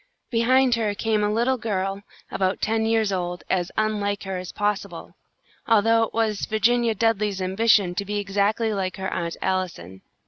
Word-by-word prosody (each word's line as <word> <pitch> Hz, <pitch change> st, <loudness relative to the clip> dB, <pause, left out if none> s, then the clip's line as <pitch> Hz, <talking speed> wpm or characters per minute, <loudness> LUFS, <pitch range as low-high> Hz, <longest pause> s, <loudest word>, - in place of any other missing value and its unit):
Behind 255 Hz, +2 st, +3 dB
her 220 Hz, -3 st, 0 dB
came 215 Hz, 0 st, 0 dB
a 210 Hz, -, +1 dB
little 240 Hz, +4 st, +1 dB
girl 195 Hz, -2 st, -2 dB, 0.3 s
about 190 Hz, 0 st, 0 dB
ten 220 Hz, +1 st, 0 dB
years 225 Hz, -2 st, +1 dB
old, 180 Hz, -1 st, -3 dB
as 180 Hz, -1 st, 0 dB
unlike 205 Hz, -2 st, -1 dB
her 190 Hz, -1 st, -4 dB
as 180 Hz, -1 st, -7 dB
possible, 205 Hz, -4 st, -3 dB, 0.5 s
although 225 Hz, 0 st, +4 dB
it 225 Hz, -, 0 dB
was 220 Hz, -3 st, 0 dB
Virginia 230 Hz, +1 st, +2 dB
Dudley's 210 Hz, -2 st, 0 dB
ambition 190 Hz, 0 st, +2 dB
to 200 Hz, -, -2 dB
be 205 Hz, +1 st, -3 dB
exactly 205 Hz, +2 st, 0 dB
like 190 Hz, -2 st, -3 dB
her 190 Hz, 0 st, -3 dB
Aunt 170 Hz, -1 st, -3 dB
Allison. 170 Hz, -, -3 dB
205 Hz, 165 wpm, -24 LUFS, 190-225 Hz, 0.5 s, although